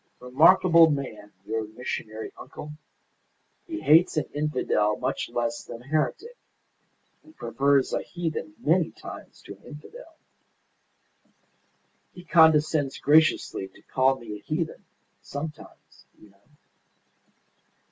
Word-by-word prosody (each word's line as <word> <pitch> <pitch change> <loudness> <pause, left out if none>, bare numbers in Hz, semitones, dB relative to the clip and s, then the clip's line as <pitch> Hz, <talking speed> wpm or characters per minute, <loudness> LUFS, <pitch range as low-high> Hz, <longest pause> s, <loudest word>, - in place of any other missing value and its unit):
Remarkable 165 +6 +5
man, 130 -8 -4
your 110 0 -2
missionary 110 -1 -6
uncle. 150 - -10 1.0
He 325 -1 -5
hates 160 +2 +4
an 155 - +1
infidel 130 -8 0
much - - -3
less 120 0 -2
than 115 +1 -10
a - - -19
heretic, 235 - -1 0.9
and 315 - -20
prefers 140 -1 +1
a - - 0
heathen 160 -2 -5
many 165 +2 +2
times - - -12
to 100 - -10
an 100 - -28
infidel. 325 - -13 2.0
He 180 - -11
condescends 155 -4 +3
graciously 150 -9 +2
to 95 - -21
call 130 0 +1
me 105 -3 -8
a - - -22
heathen, 155 +1 -4 0.4
sometimes, 150 +2 -9
you 105 - -19
know." 100 +1 -31
150 Hz, 115 wpm, -26 LUFS, 120-160 Hz, 2.0 s, Remarkable